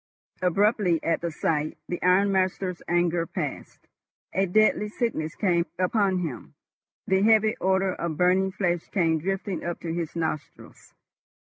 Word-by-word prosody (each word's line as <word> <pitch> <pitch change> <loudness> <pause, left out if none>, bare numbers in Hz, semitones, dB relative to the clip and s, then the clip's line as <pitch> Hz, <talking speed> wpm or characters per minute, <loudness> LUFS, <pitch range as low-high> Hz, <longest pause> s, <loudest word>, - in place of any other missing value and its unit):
Abruptly, 185 -1 +2
at 165 - 0
the 170 - -2
sight, 155 -1 -1
the 175 - -4
ironmaster's 185 -1 +1
anger 175 -1 +1
passed. - - -6 0.5
A 195 +1 +1
deadly 210 +2 +3
sickness 210 -9 -2
came 175 -4 +1
upon 185 0 +1
him. 135 -9 -7 0.5
The 190 0 +2
heavy 220 +1 +4
odour 190 0 +2
of 170 -4 -4
burning 185 +2 +3
flesh 175 -3 -1
came 165 -5 +1
drifting 195 +2 -3
up 175 0 -4
to 165 -1 -4
his 170 -2 -4
nostrils. 160 -3 -5
180 Hz, 135 wpm, -26 LUFS, 170-195 Hz, 0.5 s, heavy